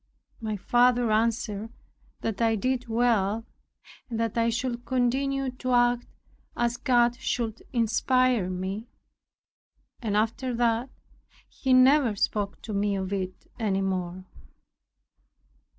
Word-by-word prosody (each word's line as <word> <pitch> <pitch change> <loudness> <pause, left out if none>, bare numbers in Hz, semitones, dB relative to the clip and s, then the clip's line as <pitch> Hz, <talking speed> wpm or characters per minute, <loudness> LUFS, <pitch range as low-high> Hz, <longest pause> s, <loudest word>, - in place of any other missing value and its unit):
My 215 -2 -3
father 245 +2 +3
answered 220 -1 0 0.5
that 225 0 -3
I 225 -1 +3
did 250 +3 -1
well, 225 -2 +1 0.6
and 230 -2 -3
that 230 -2 -1
I 230 0 +2
should 240 +1 -2
continue 260 +2 0
to 255 0 -3
act 245 0 +3 0.5
as 240 0 0
God 240 -1 +3
should 235 -4 -2
inspire 240 -2 +2
me. 190 +5 -4 1.1
And 210 -3 0
after 235 +3 0
that, 235 +1 +1 0.6
he 265 - -3
never 255 -2 +5
spoke 200 0 -1
to 215 - -5
me 200 0 +1
of 190 0 -3
it 185 -1 -4
any 200 -4 0
more. 185 -1 -3
230 Hz, 120 wpm, -27 LUFS, 210-245 Hz, 1.1 s, never